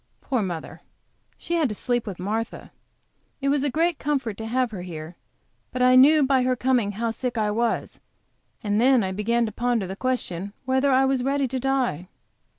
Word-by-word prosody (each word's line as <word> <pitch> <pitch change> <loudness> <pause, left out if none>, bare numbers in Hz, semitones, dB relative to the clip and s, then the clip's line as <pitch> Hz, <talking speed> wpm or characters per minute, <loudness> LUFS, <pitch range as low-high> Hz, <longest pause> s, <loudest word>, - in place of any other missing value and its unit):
Poor 255 -5 -1
mother, 175 -5 -5 0.6
she 340 - -5
had 320 -6 +2
to 210 - -4
sleep 240 +1 -1
with 195 -4 -5
Martha. 215 +5 -4 0.7
It 275 0 0
was 285 -1 +1
a 290 - +1
great 330 +4 0
comfort 270 -7 -1
to 220 - -5
have 250 +1 0
her 195 -4 -6
here, 165 -1 -8 0.6
but 255 - -1
I 255 0 +6
knew 290 +4 +7
by 265 -1 +3
her 255 0 +1
coming 250 -5 +1
how 230 +3 -2
sick 245 +1 -4
I 210 -1 +1
was, 230 +2 -1 0.6
and 210 +1 +1
then 255 -2 +4
I 190 - -2
began 230 +4 0
to 220 - -4
ponder 240 -1 0
the 190 +1 -6
question 200 -6 -2
whether 265 +2 +2
I 265 +1 +4
was 265 -2 +1
ready 275 0 +1
to 260 +1 -2
die. 250 - -1
245 Hz, 195 wpm, -24 LUFS, 210-265 Hz, 0.7 s, knew